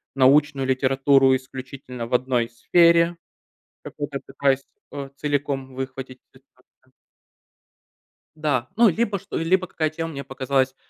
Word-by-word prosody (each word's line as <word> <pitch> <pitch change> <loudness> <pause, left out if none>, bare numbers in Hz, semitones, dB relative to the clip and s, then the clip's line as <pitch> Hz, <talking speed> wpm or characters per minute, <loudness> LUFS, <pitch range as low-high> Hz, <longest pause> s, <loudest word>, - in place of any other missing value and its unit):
научную 140 +1 +3
литературу 135 0 +3
исключительно 130 -2 -7
в - - -8
одной 125 -2 +1
сфере, 170 +7 +3 0.7
какую-то 145 -2 -6
пытаюсь, 135 0 0 0.3
э, 140 -1 -6
целиком 140 -2 -2
выхватить 130 -1 -6
специально. 130 -1 -26 1.7
Да. 145 -5 -1
Ну, 230 0 +6
либо, 205 +1 -1
чт - - -21
либо, 185 +3 +1
какая 155 -3 -1
тема 165 +1 -5
мне 140 -1 -6
показалась, 135 0 -1
135 Hz, 115 wpm, -23 LUFS, 130-150 Hz, 1.7 s, Ну